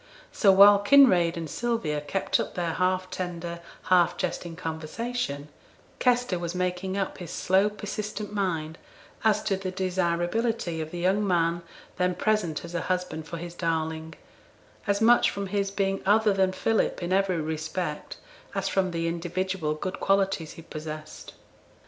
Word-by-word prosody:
So, 200 - +4
while 200 +1 +8
Kinraid 200 -8 +5
and 165 -1 -4
Sylvia 185 -6 -1
kept 170 +6 0
up - - -4
their 175 -2 -1
half 185 +1 0
tender, 170 -1 -4 0.2
half 180 -2 +3
jesting 175 -2 -3
conversation, 160 0 -4 0.5
Kester 245 -7 +2
was 170 0 -4
making 180 +1 -2
up 195 0 -2
his 175 - -7
slow 190 +3 +2
persistent 210 0 -5
mind 165 -5 -2 0.4
as 215 -1 +3
to 195 - 0
the 190 -1 -4
desirability 185 +1 -1
of 155 - -5
the 175 - -7
young 190 +4 +1
man 170 -1 +1 0.4
then 180 0 +1
present 180 -6 0
as 170 - -9
a 170 - -1
husband 180 -4 -2
for 170 - -5
his 170 +1 -7
darling, 160 -1 -2 0.7
as 200 +1 +1
much 235 +2 +6
from 200 0 -4
his 200 0 -1
being 195 -1 -1
other 210 +1 +4
than 190 -1 +2
Philip 210 -1 0
in 175 +2 -1
every 190 -3 +2
respect, 160 +1 -4 0.4
as 195 0 -1
from 190 -1 +1
the 165 -1 -2
individual 175 -1 -2
good 185 +4 -5
qualities 195 -5 +1
he 165 - -11
possessed. 155 -1 -8
185 Hz, 155 wpm, -27 LUFS, 165-200 Hz, 0.7 s, while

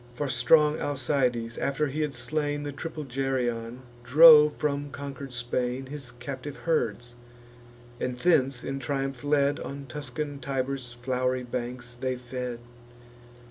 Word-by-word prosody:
For 145 +3 -2
strong 150 +5 +4
Alcides, 130 -4 -1
after 140 +2 0
he 150 +2 -2
had 150 -3 -1
slain 145 +4 -2
The 145 - -4
triple 155 +2 -6
Geryon, 125 -3 -2 0.2
drove 150 +3 +8
from 145 -1 -1
conquer'd 140 -1 -7
Spain 125 +2 -2
His 135 -2 -7
captive 130 +4 -7
herds; 120 -7 0 0.9
and, 125 -1 -2
thence 135 -4 +2
in 135 0 -3
triumph 135 -1 -3
led, 145 0 +2
On 140 0 -6
Tuscan 145 +2 -5
Tiber's 135 -1 -3
flow'ry 125 +1 -1
banks 125 0 -5
they 130 +1 -2
fed. 125 -1 -5
135 Hz, 130 wpm, -27 LUFS, 125-145 Hz, 0.9 s, drove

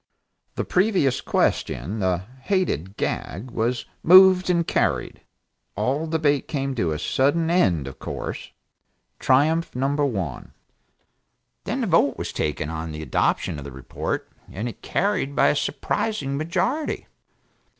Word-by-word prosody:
The - - -2
"previous 185 - +2
question," 105 +5 0
that 95 -1 0 0.2
hated 105 - -1
gag, 105 - -3
was 115 +2 -1 0.2
moved 185 +1 +7
and 170 -2 +2
carried. - - 0 0.5
All 145 +5 -1
debate 150 -3 +1
came 135 -3 -2
to 90 -10 0
a 75 - -1
sudden 145 - +1
end, 85 - +2
of 70 - -9
course. - - -5 0.7
Triumph 155 +5 +2
No. 135 +2 +1
1. 95 - -3 1.1
Then 245 +6 -2
the - - +1
vote 165 -7 +3
was - - -4
taken 75 -1 -2
on 80 0 -5
the 75 0 -6
adoption 75 - 0
of - - -7
the 70 - -8
report 65 -1 -4 0.2
and 110 +5 -4
it 120 - -8
carried 185 -8 -1
by 120 - +4
a - - +2
surprising 145 0 -1
majority. 185 - -1
135 Hz, 135 wpm, -24 LUFS, -, 1.1 s, moved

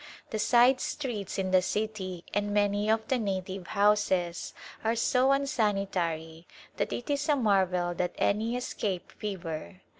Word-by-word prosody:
The 215 - -2
side 245 +3 +5
streets 230 -9 -3
in 190 -1 -1
the 185 0 +5
city 190 -3 -3
and 205 0 0
many 205 0 +1
of 220 0 +1
the 260 - +1
native 190 -3 -3
houses 200 -4 +1 0.3
are 225 +1 +1
so 255 +3 +3
unsanitary 195 - -1 0.3
that - - -1
it 240 - -4
is 290 +2 -1
a 295 - +5
marvel 190 -7 +2
that 175 +1 -2
any 220 +4 +1
escape 205 -7 -3
fever. 185 -3 -6
205 Hz, 145 wpm, -29 LUFS, 185-225 Hz, 0.3 s, side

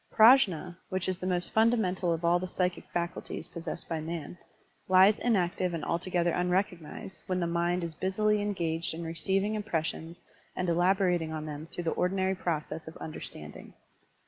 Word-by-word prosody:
PrajM, 215 - +5
which 185 -1 -1
is 185 -1 -1
the 185 - -3
most 180 -1 0
ftmda 230 +2 +4
mental 185 -4 0
of 165 +1 -1
all 175 +1 +4
the 185 - -4
psychic 180 -1 -1
faculties 170 0 -3
possessed 170 -1 -5
by 165 -2 -2
man, 165 +1 -5 0.5
lies 190 +3 +6
inactive 180 -5 +1
and 160 - -4
altogether 175 0 0
unrecognized 180 0 -2
when 185 0 +1
the 175 - +1
mind 170 +1 0
is 165 -1 -4
busily 210 +5 +1
engaged 170 -6 -1
in 170 - -5
receiving 190 +6 0
^impressions 165 -3 -3 0.4
and 180 - -1
elaborating 175 -1 +2
on 155 -1 -4
them 150 +1 -6
through 175 - -6
the 165 - 0
ordinary 190 +1 +1
process 160 -3 -3
of 160 - -9
understanding. 75 - -8
175 Hz, 165 wpm, -30 LUFS, 165-190 Hz, 0.5 s, lies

